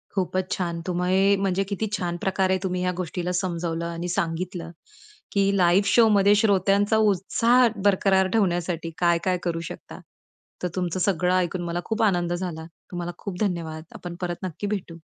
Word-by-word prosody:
खूपच 185 Hz, 0 st, -1 dB
छान! 170 Hz, -2 st, -2 dB
तुम्ही 185 Hz, +3 st, +2 dB
म्हणजे 195 Hz, 0 st, 0 dB
किती 215 Hz, +2 st, -2 dB
छान 175 Hz, -2 st, -3 dB
प्रकारे 190 Hz, -1 st, +1 dB
तुम्ही 180 Hz, -1 st, -1 dB
ह्या 180 Hz, 0 st, +1 dB
गोष्टीला 180 Hz, 0 st, -3 dB
समजवलं 170 Hz, -2 st, -2 dB
आणि 170 Hz, +1 st, -4 dB
सांगितलं 170 Hz, 0 st, -3 dB, 0.6 s
की 200 Hz, -1 st, +2 dB
लाईव्ह 185 Hz, +2 st, +4 dB
शोमध्ये 205 Hz, -3 st, +5 dB
श्रोत्यांचा 205 Hz, 0 st, +3 dB
उत्साह 220 Hz, +4 st, +3 dB, 0.2 s
बरकरार 190 Hz, -1 st, +3 dB
ठेवण्यासाठी 175 Hz, -5 st, 0 dB
काय-काय 175 Hz, +1 st, +2 dB
करू 170 Hz, -1 st, -1 dB
शकता. -, -, -10 dB, 0.6 s
तर -, -, +2 dB
तुमचं 180 Hz, -1 st, -2 dB
सगळं 180 Hz, -1 st, +1 dB
ऐकून 180 Hz, 0 st, 0 dB
मला 170 Hz, 0 st, -2 dB
खूप 220 Hz, +1 st, -2 dB
आनंद 175 Hz, -4 st, +1 dB
झाला. 175 Hz, -3 st, -4 dB, 0.3 s
तुम्हाला 175 Hz, -1 st, -4 dB
खूप 190 Hz, -3 st, -6 dB
धन्यवाद. 165 Hz, -6 st, -2 dB
आपण 175 Hz, -1 st, -7 dB
परत 175 Hz, 0 st, -4 dB
नक्की 185 Hz, +3 st, -4 dB
भेटू. 185 Hz, -5 st, -4 dB
180 Hz, 150 wpm, -25 LUFS, 175-195 Hz, 0.6 s, शोमध्ये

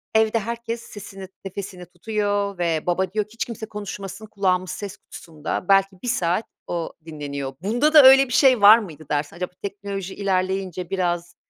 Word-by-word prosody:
Evde 220 Hz, +1 st, +3 dB
herkes 235 Hz, +1 st, -4 dB
sesini, 195 Hz, -3 st, -10 dB, 0.2 s
nefesini 190 Hz, -1 st, -7 dB
tutuyor 205 Hz, +2 st, -2 dB
ve 165 Hz, -3 st, -1 dB
baba 185 Hz, +1 st, 0 dB
diyor 210 Hz, -1 st, 0 dB
ki 210 Hz, -, -20 dB
"Hiç 230 Hz, -, -3 dB
kimse 225 Hz, -2 st, -7 dB
konuşmasın." 210 Hz, -1 st, -7 dB
Kulağımız 185 Hz, -3 st, 0 dB
ses 200 Hz, -2 st, -6 dB
kutusunda 155 Hz, +1 st, -6 dB
belki 195 Hz, -1 st, +3 dB
1 -, -, -4 dB
saat 185 Hz, -3 st, 0 dB, 0.2 s
o 170 Hz, -2 st, -3 dB
dinleniyor. 140 Hz, -4 st, -5 dB
Bunda 240 Hz, -, +1 dB
da 300 Hz, -2 st, +10 dB
öyle 270 Hz, +1 st, +8 dB
bir 250 Hz, -, -5 dB
şey 260 Hz, -3 st, +5 dB
var 210 Hz, +2 st, +10 dB
mıydı 160 Hz, -9 st, -8 dB
dersin? 145 Hz, +1 st, -2 dB
Acaba 180 Hz, +1 st, -4 dB
teknoloji 200 Hz, -1 st, -5 dB
ilerleyince 185 Hz, -2 st, -1 dB
biraz, 175 Hz, -2 st, -2 dB
195 Hz, 165 wpm, -23 LUFS, 180-215 Hz, 0.2 s, da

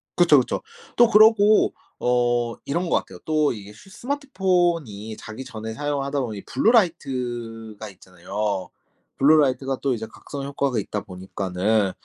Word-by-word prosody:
그쵸, 165 Hz, -6 st, +6 dB
그쵸. 125 Hz, -, -2 dB, 0.3 s
또 240 Hz, -1 st, +6 dB
그러고 215 Hz, 0 st, +5 dB, 0.3 s
어 120 Hz, -1 st, +1 dB
이런 170 Hz, +4 st, -1 dB
것 -, -, +3 dB
같아요. -, -, -7 dB
또 155 Hz, -1 st, +2 dB
이게 105 Hz, -1 st, -10 dB
스 150 Hz, -, -17 dB
스마트폰이 175 Hz, -, -1 dB
자기 110 Hz, +4 st, -8 dB
전에 110 Hz, -2 st, -7 dB
사용하다 145 Hz, 0 st, -2 dB
보면 115 Hz, -4 st, -4 dB
이 100 Hz, -, -8 dB
블루 225 Hz, -, +2 dB
라이트가 120 Hz, -, -1 dB
있잖아요. 95 Hz, +1 st, -4 dB, 0.5 s
블루 150 Hz, +3 st, +6 dB
라이트가 135 Hz, -2 st, +1 dB
또 135 Hz, -2 st, +1 dB
이제 110 Hz, 0 st, -5 dB
각성 140 Hz, -1 st, -8 dB
효과가 140 Hz, -3 st, -1 dB
있다 105 Hz, 0 st, -4 dB
보니까는 95 Hz, +2 st, -1 dB
125 Hz, 325 characters per minute, -23 LUFS, 110-160 Hz, 0.5 s, 그쵸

